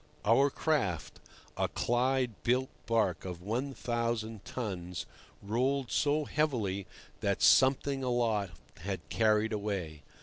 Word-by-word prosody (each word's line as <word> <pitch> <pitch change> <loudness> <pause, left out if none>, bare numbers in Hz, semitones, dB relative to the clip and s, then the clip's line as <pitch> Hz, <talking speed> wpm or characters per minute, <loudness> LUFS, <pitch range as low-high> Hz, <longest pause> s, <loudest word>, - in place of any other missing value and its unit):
Our 125 +6 +5
craft, 130 - -1 0.4
a - - +1
Clyde 125 -1 0
built 130 +2 +1 0.2
barque 110 -7 +1
of 90 -2 -6
1,000 115 -2 -2
tons, 90 -7 -4 0.4
rolled 130 +5 0
so 150 +1 +2
heavily 110 -13 -1 0.3
that - - 0
something 135 +1 +4
aloft 110 -8 0 0.2
had 95 +1 -5
carried 110 0 +2
away. 95 -8 -3
115 Hz, 105 wpm, -31 LUFS, 100-130 Hz, 0.4 s, Our